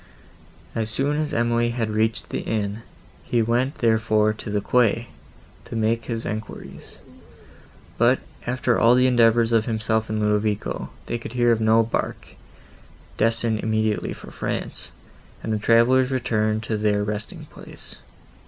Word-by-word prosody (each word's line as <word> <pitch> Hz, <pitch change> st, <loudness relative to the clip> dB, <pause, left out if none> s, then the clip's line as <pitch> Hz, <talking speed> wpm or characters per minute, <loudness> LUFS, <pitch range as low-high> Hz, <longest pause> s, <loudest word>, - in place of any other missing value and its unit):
As 110 Hz, -1 st, -2 dB
soon 140 Hz, +6 st, 0 dB
as 155 Hz, -1 st, -1 dB
Emily 120 Hz, 0 st, +1 dB
had 115 Hz, -2 st, -2 dB
reached 110 Hz, +1 st, 0 dB
the -, -, -2 dB
inn, 105 Hz, -1 st, -2 dB, 0.4 s
he 120 Hz, -2 st, +1 dB
went 125 Hz, +6 st, 0 dB
therefore 110 Hz, -3 st, +2 dB
to 110 Hz, -, -8 dB
the 105 Hz, 0 st, 0 dB
quay, 115 Hz, +1 st, +2 dB, 0.6 s
to -, -, -7 dB
make 115 Hz, +1 st, 0 dB
his 115 Hz, -1 st, -4 dB
enquiries; 110 Hz, +1 st, -7 dB, 1.0 s
but, 120 Hz, +3 st, +5 dB, 0.3 s
after 125 Hz, -1 st, +1 dB
all 115 Hz, +2 st, +6 dB
the 125 Hz, 0 st, +4 dB
endeavours 120 Hz, -2 st, +4 dB
of 115 Hz, -1 st, +3 dB
himself 110 Hz, -1 st, -1 dB
and 110 Hz, 0 st, -1 dB
Ludovico, 105 Hz, 0 st, -1 dB, 0.2 s
they 120 Hz, -, -3 dB
could 115 Hz, -, -8 dB
hear 120 Hz, -1 st, +3 dB
of 115 Hz, -1 st, +1 dB
no 110 Hz, +1 st, +5 dB
bark, 115 Hz, -, -3 dB, 0.9 s
destined 115 Hz, 0 st, +2 dB
immediately 110 Hz, -1 st, 0 dB
for -, -, -9 dB
France, -, -, -4 dB, 0.5 s
and 110 Hz, -, -1 dB
the 105 Hz, -, 0 dB
travellers 120 Hz, +4 st, +4 dB
returned 110 Hz, -4 st, 0 dB
to 110 Hz, -1 st, -2 dB
their 105 Hz, -1 st, +1 dB
resting 105 Hz, +1 st, -5 dB
place. -, -, -4 dB
115 Hz, 145 wpm, -23 LUFS, 110-120 Hz, 1.0 s, all